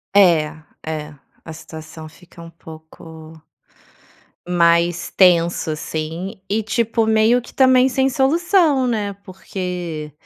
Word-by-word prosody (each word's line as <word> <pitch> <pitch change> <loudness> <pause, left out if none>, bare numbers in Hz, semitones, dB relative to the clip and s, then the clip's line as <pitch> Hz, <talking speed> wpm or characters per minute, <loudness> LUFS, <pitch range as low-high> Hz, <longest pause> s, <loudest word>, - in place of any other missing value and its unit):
É. 160 -5 +3 0.2
é. 155 -1 -6 0.3
A 160 - -8
situação 160 0 -11
fica 170 +2 -18
um 165 - -11
pouco 160 0 -13 1.1
mais 170 0 +2
tenso, 175 -3 +3
assim, 160 +4 -5
e 220 +2 0
tipo, 230 +1 -1
meio 220 +3 +3
que - - -15
também 260 -1 +4
sem 265 +1 +1
solução, 300 +1 +2
né, 210 -4 -2
porque, 180 -5 -6
180 Hz, 110 wpm, -19 LUFS, 160-230 Hz, 1.1 s, também